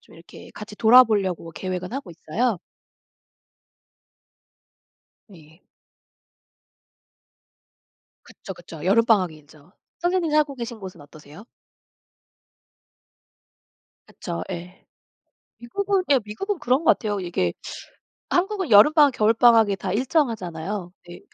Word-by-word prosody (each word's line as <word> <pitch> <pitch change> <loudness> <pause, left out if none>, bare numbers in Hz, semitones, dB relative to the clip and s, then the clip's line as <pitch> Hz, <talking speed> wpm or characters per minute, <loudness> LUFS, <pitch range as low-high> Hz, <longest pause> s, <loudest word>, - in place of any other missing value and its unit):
좀 - - -21
이렇게 165 +2 -15
같이 210 0 -10
돌아보려고 215 -8 +4
계획은 185 +3 -6
하고 270 -9 -6
있어요. 195 +7 -2 2.7
예. 160 0 -18 2.6
그쵸, 190 - -11
그쵸. 170 -3 -12
여름방학이 200 -4 +2
길죠. 150 +2 -20 0.3
선생님 350 -2 0
살고 300 -2 +1
계신 235 -2 -7
곳은 185 -5 -10
어떠세요? 150 +6 -15 2.6
그쵸. 170 -2 -6
예. 180 +1 -9 0.7
미국은 390 +10 -2
예. 275 - +5
미국은 370 - -4
그런 265 +4 0
것 - - +6
같아요. 205 -2 -3
이게 170 - -2 0.8
한국은 380 - -1
여름방학 285 +7 +6
겨울방학이 225 -2 +3
다 190 -1 -4
일정하잖아요. 205 - -2
근데 175 0 -12
210 Hz, 235 characters per minute, -23 LUFS, 175-255 Hz, 2.7 s, 것